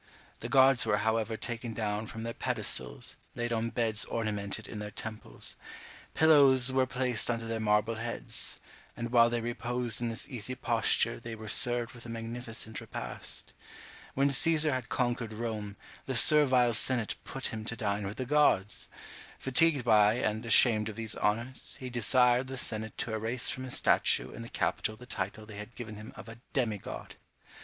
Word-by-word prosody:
The -, -, -6 dB
gods 135 Hz, -1 st, +5 dB
were 105 Hz, -, +1 dB
however 110 Hz, +1 st, -1 dB
taken 120 Hz, -1 st, -5 dB
down 105 Hz, 0 st, -2 dB
from 110 Hz, +1 st, -7 dB
their 115 Hz, 0 st, -4 dB
pedestals, 60 Hz, -, -2 dB, 0.2 s
laid 120 Hz, 0 st, -2 dB
on 115 Hz, 0 st, -1 dB
beds 115 Hz, -2 st, -1 dB
ornamented 105 Hz, -1 st, -4 dB
in 105 Hz, -, -7 dB
their 105 Hz, 0 st, -5 dB
temples; 110 Hz, +1 st, -5 dB, 0.6 s
pillows 140 Hz, -5 st, +6 dB
were 130 Hz, 0 st, +2 dB
placed 125 Hz, -3 st, -1 dB
under 115 Hz, -1 st, -2 dB
their 115 Hz, 0 st, -3 dB
marble 105 Hz, +1 st, +1 dB
heads; 115 Hz, +1 st, -2 dB, 0.4 s
and 115 Hz, 0 st, -4 dB
while 120 Hz, -1 st, +5 dB
they 120 Hz, 0 st, -2 dB
reposed 120 Hz, -1 st, -3 dB
in 120 Hz, -, -1 dB
this 115 Hz, +2 st, -3 dB
easy 125 Hz, 0 st, -5 dB
posture 115 Hz, -1 st, +1 dB
they 115 Hz, -1 st, -7 dB
were 110 Hz, 0 st, -10 dB
served 120 Hz, +1 st, +3 dB
with 120 Hz, -1 st, -11 dB
a -, -, -9 dB
magnificent 115 Hz, -1 st, -3 dB
repast. -, -, -7 dB, 0.6 s
When 140 Hz, +1 st, +2 dB
Cæsar 155 Hz, +2 st, +4 dB
had 130 Hz, -4 st, -3 dB
conquered 120 Hz, -2 st, -2 dB
Rome, 105 Hz, -2 st, -5 dB, 0.3 s
the 135 Hz, -, -1 dB
servile 130 Hz, -3 st, +6 dB
senate 115 Hz, -1 st, +1 dB
put 135 Hz, -3 st, -3 dB
him 110 Hz, -1 st, -5 dB
to 115 Hz, -, -2 dB
dine 105 Hz, -3 st, -2 dB
with 100 Hz, -, -7 dB
the 130 Hz, -, -3 dB
gods! 125 Hz, -8 st, +1 dB, 0.5 s
Fatigued 140 Hz, 0 st, +3 dB
by 105 Hz, -2 st, +5 dB
and 110 Hz, -2 st, -2 dB
ashamed 110 Hz, -2 st, +5 dB
of 110 Hz, -, -8 dB
these 110 Hz, -1 st, -1 dB
honours, 115 Hz, +5 st, 0 dB
he 130 Hz, -1 st, -7 dB
desired 125 Hz, +2 st, +3 dB
the 135 Hz, 0 st, -6 dB
senate 110 Hz, -3 st, -3 dB
to 115 Hz, -, -3 dB
erase 115 Hz, +3 st, -1 dB
from 130 Hz, -, -5 dB
his 130 Hz, -, +2 dB
statue -, -, +2 dB
in -, -, -9 dB
the 115 Hz, -, -8 dB
capitol 110 Hz, +1 st, -2 dB
the 125 Hz, -, -13 dB
title 105 Hz, -2 st, -4 dB
they 105 Hz, -1 st, -11 dB
had 105 Hz, +3 st, -9 dB
given 110 Hz, -3 st, -8 dB
him 105 Hz, +2 st, -10 dB
of -, -, -11 dB
a 115 Hz, +1 st, -11 dB
demi 115 Hz, -6 st, 0 dB
god! -, -, -9 dB
115 Hz, 180 wpm, -30 LUFS, 110-125 Hz, 0.6 s, pillows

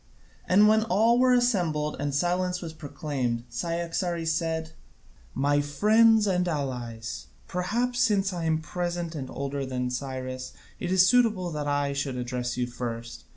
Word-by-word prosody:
And 205 Hz, +3 st, +5 dB
when 220 Hz, +1 st, +5 dB
all 225 Hz, +4 st, +3 dB
were 255 Hz, 0 st, +5 dB
assembled 175 Hz, -12 st, +1 dB
and 145 Hz, 0 st, -1 dB
silence 180 Hz, +3 st, 0 dB
was 165 Hz, -3 st, -7 dB
proclaimed, 140 Hz, -6 st, -3 dB
Cyaxares 170 Hz, +4 st, -2 dB
said: 160 Hz, -1 st, -2 dB, 0.6 s
"My 145 Hz, +2 st, +2 dB
friends 215 Hz, +9 st, +4 dB
and 180 Hz, -2 st, +1 dB
allies, 125 Hz, -8 st, -4 dB, 0.2 s
perhaps, 235 Hz, +8 st, -1 dB
since 205 Hz, -6 st, +2 dB
I 170 Hz, -2 st, -3 dB
am 160 Hz, 0 st, +1 dB
present 175 Hz, 0 st, -3 dB
and 135 Hz, -4 st, -5 dB
older 140 Hz, 0 st, -3 dB
than 125 Hz, -1 st, -2 dB
Cyrus, 130 Hz, 0 st, -5 dB, 0.3 s
it -, -, -3 dB
is 185 Hz, -1 st, +6 dB
suitable 215 Hz, -7 st, +3 dB
that 150 Hz, -2 st, -3 dB
I 145 Hz, -1 st, 0 dB
should 140 Hz, -2 st, -2 dB
address 125 Hz, 0 st, -3 dB
you 125 Hz, -, +1 dB
first. 115 Hz, -, -6 dB
160 Hz, 150 wpm, -27 LUFS, 135-185 Hz, 0.6 s, is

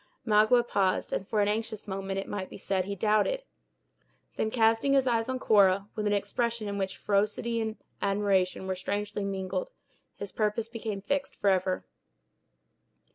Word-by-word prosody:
Magua 220 Hz, +2 st, +4 dB
paused, 190 Hz, -4 st, +1 dB
and 190 Hz, -, -2 dB
for 215 Hz, -2 st, +1 dB
an 205 Hz, -, +3 dB
anxious 215 Hz, 0 st, -2 dB
moment, 195 Hz, 0 st, -3 dB
it 195 Hz, -, -3 dB
might 190 Hz, -2 st, -4 dB
be -, -, -9 dB
said, 190 Hz, -2 st, -1 dB
he 200 Hz, +1 st, -3 dB
doubted; 215 Hz, -, +2 dB, 0.9 s
then, 220 Hz, -, 0 dB
casting 225 Hz, +4 st, +3 dB
his 270 Hz, -1 st, +4 dB
eyes 230 Hz, -1 st, +1 dB
on 260 Hz, -, 0 dB
Cora, 200 Hz, -4 st, +4 dB
with 215 Hz, -1 st, -2 dB
an 205 Hz, -, +2 dB
expression 220 Hz, +2 st, -1 dB
in 200 Hz, 0 st, -3 dB
which 190 Hz, -1 st, -2 dB
ferocity 210 Hz, +3 st, 0 dB
and 220 Hz, 0 st, -3 dB, 0.2 s
admiration 195 Hz, -2 st, +1 dB
were 190 Hz, -, -1 dB
strangely 205 Hz, +2 st, -3 dB
mingled, 195 Hz, -, -2 dB, 0.5 s
his 200 Hz, -, -6 dB
purpose 215 Hz, +1 st, 0 dB
became 225 Hz, -3 st, -5 dB
fixed 280 Hz, +7 st, -2 dB
forever. 185 Hz, -2 st, +1 dB
210 Hz, 160 wpm, -29 LUFS, 195-225 Hz, 0.9 s, Magua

